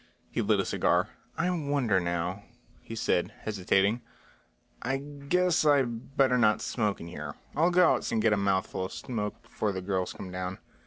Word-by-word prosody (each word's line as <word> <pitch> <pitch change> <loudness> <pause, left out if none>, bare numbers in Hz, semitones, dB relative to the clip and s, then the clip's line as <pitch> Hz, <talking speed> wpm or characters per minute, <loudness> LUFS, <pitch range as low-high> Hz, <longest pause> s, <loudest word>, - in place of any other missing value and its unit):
He - - 0
lit - - +2
a - - +1
cigar. - - +2 0.3
"I 170 - +1
wonder 140 - +1
now," 85 +2 -2 0.4
he 115 - -8
said, 90 -5 0
hesitating. 100 +2 +1 0.8
"I 135 +2 0
guess 145 +6 +1
I 145 -3 +5
better 125 +2 +1
not 105 -2 +4
smoke 105 -4 -1
in 85 - -8
here. 75 -4 -6 0.2
I'll 165 +3 +4
go 180 -1 +5
outside - - -1
and 110 - +2
get 110 - +4
a - - +2
mouthful 95 -1 0
of - - -7
smoke 105 -4 -4
before 105 - -2
the 95 - -3
girls 95 -1 -1
come 95 - -8
down." 90 0 -4
110 Hz, 175 wpm, -29 LUFS, 95-140 Hz, 0.8 s, I